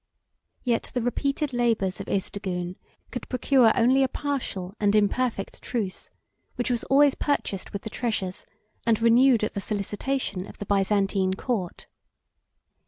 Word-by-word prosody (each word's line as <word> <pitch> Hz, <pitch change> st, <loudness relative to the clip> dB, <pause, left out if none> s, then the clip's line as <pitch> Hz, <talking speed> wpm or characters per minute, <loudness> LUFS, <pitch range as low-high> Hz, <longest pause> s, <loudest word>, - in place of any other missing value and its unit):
Yet 240 Hz, -3 st, 0 dB
the 245 Hz, -, +1 dB
repeated 275 Hz, +3 st, -1 dB
labors 225 Hz, -6 st, +1 dB
of 195 Hz, -, -6 dB
Isdigune 185 Hz, -2 st, -2 dB, 0.4 s
could 245 Hz, -, -6 dB
procure 255 Hz, -2 st, +4 dB
only 255 Hz, +3 st, +4 dB
a 265 Hz, -, +4 dB
partial 250 Hz, -11 st, -3 dB
and 205 Hz, 0 st, +3 dB
imperfect 215 Hz, 0 st, 0 dB
truce, 215 Hz, -7 st, -3 dB, 0.5 s
which 245 Hz, 0 st, -1 dB
was 240 Hz, -2 st, 0 dB
always 280 Hz, 0 st, +5 dB
purchased 245 Hz, -9 st, -2 dB
with 200 Hz, -, -5 dB
the 220 Hz, -, -5 dB
treasures, 205 Hz, -6 st, -3 dB, 0.4 s
and 230 Hz, -2 st, +2 dB
renewed 235 Hz, +1 st, +5 dB
at 215 Hz, -, -1 dB
the 200 Hz, -, -3 dB
solicitation, 205 Hz, 0 st, -2 dB
of -, -, -12 dB
the 205 Hz, -, -6 dB
Byzantine 195 Hz, -1 st, +1 dB
court. 190 Hz, -6 st, -3 dB
225 Hz, 140 wpm, -26 LUFS, 195-250 Hz, 0.5 s, always